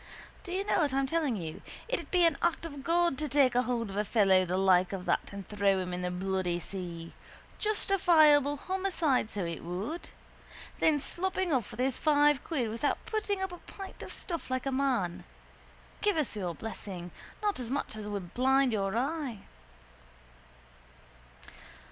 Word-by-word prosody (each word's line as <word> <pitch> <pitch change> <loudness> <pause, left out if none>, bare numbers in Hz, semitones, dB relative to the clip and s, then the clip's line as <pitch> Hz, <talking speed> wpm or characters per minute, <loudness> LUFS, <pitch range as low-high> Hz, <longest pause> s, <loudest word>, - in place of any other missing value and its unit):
Do 360 - -7
you 380 +2 0
know - - +2
what 295 -5 +1
I'm 275 0 +2
telling 295 -3 0
you? 165 -5 -6 0.3
It'd - - -2
be 360 -2 +4
an 330 -3 +4
act 340 -1 +1
of 285 -4 -7
God 340 -2 +2
to 305 -1 -2
take 270 -2 +4
a 245 - +4
hold 235 -4 -2
of 195 - -6
a 210 - +2
fellow 195 -3 +4
the 180 +1 -1
like 185 -1 +4
of 185 -2 -4
that - - 0
and 200 -1 -7
throw 200 -2 +2
him 180 -1 -3
in 180 - -3
the 180 - -1
bloody 185 -1 -1
sea. 175 -1 -6 0.5
Justifiable 315 -9 +4
homicide, 350 - 0
so 200 -5 -3
it 170 -1 -4
would. 195 - -4 0.7
Then 305 -2 +4
sloping 370 +3 -1
off 250 -4 0
with - - -10
his 260 -1 0
five 295 -2 +4
quid 255 -9 -1
without 235 +6 -1
putting 410 -3 -1
up 380 - -2
a 355 - -8
pint 390 -1 -10
of - - -7
stuff 340 -6 -5
like 255 +1 -1
a 270 - 0
man. 255 -10 0 0.8
Give 415 -4 +2
us 295 -7 -1
your 180 -5 -3
blessing. 185 -5 -7 0.3
Not 415 -6 0
as 240 -2 -4
much 275 -4 -2
as 215 -1 -6
would 195 -4 -5
blind 265 0 +3
your 195 0 0
eye. 270 -5 -2
255 Hz, 180 wpm, -30 LUFS, 195-325 Hz, 0.8 s, be